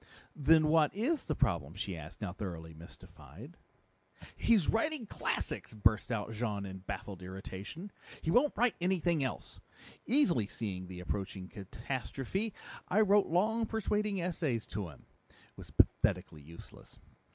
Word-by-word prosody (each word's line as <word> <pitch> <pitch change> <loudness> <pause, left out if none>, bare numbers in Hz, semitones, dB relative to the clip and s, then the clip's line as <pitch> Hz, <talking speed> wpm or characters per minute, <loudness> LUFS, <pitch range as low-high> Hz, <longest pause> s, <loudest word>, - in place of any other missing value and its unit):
"Then 155 +2 +5
what 155 -2 +5
is 270 +9 0
the 155 - -1
problem?" 80 - +1
she 95 -1 -3
asked, 80 +4 -10
now 100 -4 -3
thoroughly 85 -5 -6
mystified. 105 - -12 0.8
"He's 220 -8 +4
writing 280 +2 +1
classics!" 155 - -2
burst 110 +2 +3
out 110 -1 -1
Jean 105 -3 -2
in 95 -1 -6
baffled 95 0 -6
irritation. 95 - -7 0.3
"He 160 - +1
won't 270 - +4
write 245 -1 +4
anything 175 -4 +2
else! 130 - -4 0.5
Easily 195 - +3
seeing 95 -4 -4
the 90 -1 -7
approaching 95 0 -4
catastrophe, 130 - -3 0.4
I 205 +4 +4
wrote 205 -1 +5
long 220 +7 +2
persuading 210 -2 0
essays 160 -10 -1
to 100 -4 -2
him. 75 - -15 0.2
It - - -26 0.2
was - - -11
pathetically 75 - +2
useless. 80 +4 -13
130 Hz, 140 wpm, -33 LUFS, -, 0.8 s, Then